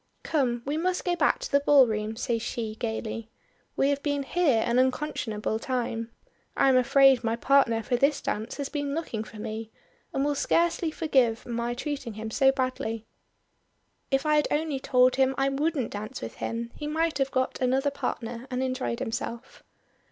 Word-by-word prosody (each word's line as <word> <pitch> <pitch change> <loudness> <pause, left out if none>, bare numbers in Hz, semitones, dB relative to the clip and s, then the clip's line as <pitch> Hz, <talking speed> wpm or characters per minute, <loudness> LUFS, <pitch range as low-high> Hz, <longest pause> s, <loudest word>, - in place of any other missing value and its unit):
"Come, 245 -6 0
we 290 +3 -1
must 360 +2 -1
go 355 -1 +1
back 425 - +3
to - - -5
the 280 - +5
ballroom," 225 -7 +3
says 230 -1 -1
she 225 -2 -3
gaily. 220 0 -4 0.5
"We 275 - +2
have 285 0 0
been 285 -1 -1
here 275 -7 +2
an 235 +1 +2
unconscionable 255 -5 -1
time. 235 -2 -2 0.5
I 275 - +5
am 260 - +4
afraid 265 0 +5
my 225 0 0
partner 235 -3 +3
for 245 - 0
this 280 +3 +2
dance 215 +1 -3
has 280 -2 -3
been 285 -1 -3
looking 240 -10 -3
for 220 - -12
me, 220 +1 -5 0.4
and 270 - 0
will 290 - +1
scarcely 335 +3 +1
forgive 265 -8 +1
my 235 0 -2
treating 270 -3 -4
him 220 +1 -5
so 270 +3 +4
badly. 255 -4 -2 1.0
If 270 +2 +1
I 305 0 +4
had 295 - +2
only 300 -2 -1
told 255 -1 +3
him 265 0 +3
I 270 0 +2
wouldn't 280 -2 -1
dance 210 +1 -6
with 115 - -7
him 230 0 -4
he 295 - -6
might 315 -1 0
have 270 0 +1
got 260 -1 -1
another 265 +3 +2
partner 240 -2 -4
and 255 0 -1
enjoyed 255 -2 -2
himself." 230 +2 -5
260 Hz, 180 wpm, -27 LUFS, 230-285 Hz, 1.0 s, the